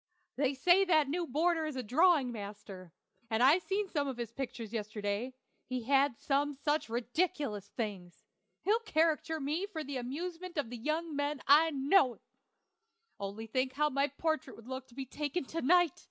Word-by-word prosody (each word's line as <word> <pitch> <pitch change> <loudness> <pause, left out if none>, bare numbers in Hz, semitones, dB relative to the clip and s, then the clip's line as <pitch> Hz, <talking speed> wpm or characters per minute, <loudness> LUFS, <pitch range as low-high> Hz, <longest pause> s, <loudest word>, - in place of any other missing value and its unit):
They 275 0 +1
say 355 +8 +5
that 310 -6 +3
new 340 +3 -1
boarder 320 +3 +1
is 305 - -5
a 255 - -3
drawing 285 - +4
master, 200 -4 -8 0.4
and 225 +1 +2
I 290 +7 +7
seen 395 +3 -1
some 290 -6 -1
of 265 -3 -4
his 235 -2 -4
pictures 235 -3 -6
yesterday; 210 +3 -3 0.3
he 255 -2 -3
had 275 0 +3
some 285 +1 0
such 295 0 -1
ridiculous 245 - -1
things. 200 -6 -6 0.4
He'll 430 +4 +3
caricature 320 -6 +1
me 305 +7 -1
for 320 -6 -5
the 280 -1 -4
amusement 335 +8 -5
of 265 -5 -1
the 245 - -5
young 310 +5 -2
men, 285 0 -1
I 310 +4 +6
know. 280 -2 +3 1.0
Only 200 +3 -5
think 255 +3 -1
how 300 +2 +1
my 275 +1 +2
portrait 315 +1 -2
would 230 - -14
look 260 0 -6 0.2
taken 295 +2 -2
to 330 +5 -4
night! 350 +2 +4
280 Hz, 170 wpm, -32 LUFS, 240-320 Hz, 1.0 s, I